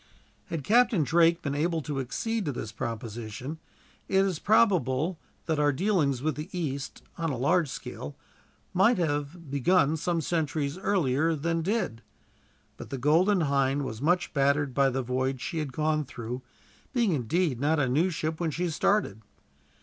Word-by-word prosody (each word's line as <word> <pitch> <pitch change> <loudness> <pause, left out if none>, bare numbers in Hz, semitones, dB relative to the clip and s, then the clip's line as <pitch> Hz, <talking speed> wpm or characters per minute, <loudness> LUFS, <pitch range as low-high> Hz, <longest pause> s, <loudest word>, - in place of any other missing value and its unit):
Had 160 -4 -4
Captain 230 - +4
Drake 170 +3 +3
been 140 - -2
able 165 +3 0
to 145 -2 -3
accede 220 - -2
to 145 - -1
this 110 -4 -5
proposition, 115 +5 -5 0.5
it 195 0 +3
is 185 -5 -2
probable 180 - +2 0.3
that 160 -2 0
our 145 0 +4
dealings 145 - +1
with 155 0 +1
the 150 +4 -7
East, 140 -6 -4 0.2
on 165 -1 0
a 135 - -2
large 155 +5 +2
scale, 70 - -7 0.6
might 200 +6 +4
have 150 -1 -2
begun 150 +2 +3
some 170 +2 -1
centuries 155 -3 -1
earlier 165 -5 +1
than 165 +2 -1
they 185 +5 -1
did; 115 - -2 0.8
but - - -9
the 135 - -4
Golden 170 - +3
Hind 140 -1 +1
was 110 -2 -6
much 175 +4 +1
battered 140 -1 +2
by 135 +1 +3
the 130 0 -2
voyage 130 +1 -1
she 160 +6 -3
had 150 -3 -3
gone 155 +2 0
through, 125 -2 -6 0.5
being, 235 -6 +2
indeed, 150 0 0
not 150 +3 +2
a 135 - +2
new 155 +9 +2
ship 155 -2 -3
when 170 -2 0
she 170 +3 -2
started. 155 - +1
155 Hz, 165 wpm, -28 LUFS, 135-175 Hz, 0.8 s, Captain